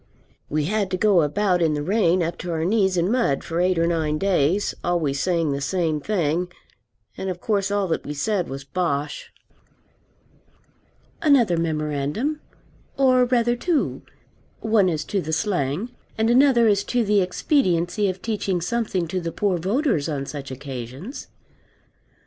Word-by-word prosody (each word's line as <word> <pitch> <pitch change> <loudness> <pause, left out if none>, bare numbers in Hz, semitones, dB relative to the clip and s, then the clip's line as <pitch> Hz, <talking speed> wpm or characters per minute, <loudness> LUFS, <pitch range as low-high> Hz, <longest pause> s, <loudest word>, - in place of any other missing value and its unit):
We 150 +1 0
had 205 +2 0
to 185 - -1
go 195 -2 +4
about 180 +4 +1
in 160 -2 +2
the 145 - -2
rain 185 -2 +2
up 170 +1 -3
to 180 - -5
our 160 -1 -1
knees 190 -2 +2
in 175 +4 +1
mud 235 - +1
for 165 +1 -3
eight 180 0 +2
or 165 - +3
nine 160 -3 0
days, 190 +1 +1
always 160 -6 0
saying 170 -3 +1
the 140 0 -2
same 160 -1 0
thing. 175 -2 -1 0.7
And 190 - -3
of 180 -1 -4
course 200 -1 0
all 200 -1 0
that 160 - -1
we 150 - -5
said 185 +4 -1
was 135 +1 -6
bosh. 145 -1 -3 1.9
Another 260 - +4
memorandum 155 - -1 0.6
or 255 -2 +4
rather 240 -1 +2
two, 320 +5 -1 0.6
one 215 -4 +3
as 155 -2 -2
to 200 - -1
the 160 - -5
slang, 175 - -1 0.3
and 220 +1 +2
another 250 -2 +5
as 200 -2 +3
to 245 -1 +1
the 205 -1 +3
expediency 185 - +1
of 185 0 -6
teaching 205 -5 -1
something 185 -1 -1
to 185 +3 -2
the 165 -1 -3
poor 190 0 0
voters 195 - 0
on 140 -3 -3
such 140 -1 -7
occasions. 135 - -7
180 Hz, 160 wpm, -23 LUFS, 155-210 Hz, 1.9 s, another